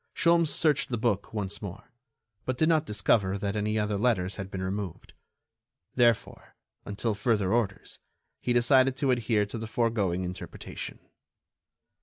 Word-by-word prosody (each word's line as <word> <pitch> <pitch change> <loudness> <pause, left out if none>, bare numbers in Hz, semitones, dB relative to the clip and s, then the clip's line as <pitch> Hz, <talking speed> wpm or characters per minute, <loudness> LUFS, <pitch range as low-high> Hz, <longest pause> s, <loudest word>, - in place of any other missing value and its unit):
Sholmes 170 -1 +4
searched 150 -3 +2
the 120 - -1
book 110 -3 0
once 100 -2 -3
more, 100 -2 -8 0.5
but 130 -1 -2
did 155 - +3
not 160 -2 +2
discover 100 -2 +1
that 100 +1 -2
any 105 +1 0
other 105 -1 0
letters 100 -6 +1
had 95 0 -6
been 95 -1 -4
removed. 95 -1 -5 0.8
Therefore, 120 -3 +1 0.3
until 105 +2 -2
further 105 -2 +1
orders, 110 -5 -2 0.4
he 125 - -1
decided 130 +2 +4
to 140 -2 +2
adhere 115 -4 +1
to 105 +3 -6
the 110 - -5
foregoing 105 -6 0
interpretation. 90 +1 -7
110 Hz, 145 wpm, -28 LUFS, 100-120 Hz, 0.8 s, Sholmes